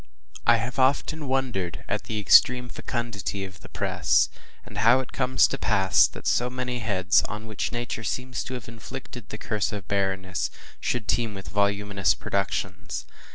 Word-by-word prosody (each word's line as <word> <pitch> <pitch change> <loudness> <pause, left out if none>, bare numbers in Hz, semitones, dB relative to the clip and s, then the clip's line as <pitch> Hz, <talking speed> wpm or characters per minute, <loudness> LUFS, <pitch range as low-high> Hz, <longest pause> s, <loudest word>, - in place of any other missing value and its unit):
I 120 - +8
HAVE 115 +3 -3
often 140 +3 +2
wondered 120 -11 -1
at - - -2
the 110 -1 -2
extreme 125 +4 +6
fecundity 115 -6 -3
of 95 -2 -11
the - - -13
press, - - +2 0.4
and 105 - -7
how 115 +4 +6
it 130 - -5
comes 130 0 +3
to 135 - -1
pass 95 -3 +4
that - - -11
so 125 +1 +2
many 125 -1 -3
heads, 95 -5 +3
on 105 +1 -6
which 110 -2 -3
Nature 120 -2 -3
seems 125 +3 -2
to 130 - -4
have 125 -1 -7
inflicted 115 0 -9
the 105 - -6
curse 110 -1 -1
of 100 -4 -6
barrenness, 95 -2 -1 0.3
should 120 -4 -1
teem 115 -3 0
with 95 - -7
voluminous 100 0 +1
productions. 95 -2 -3
110 Hz, 165 wpm, -26 LUFS, 100-125 Hz, 0.4 s, I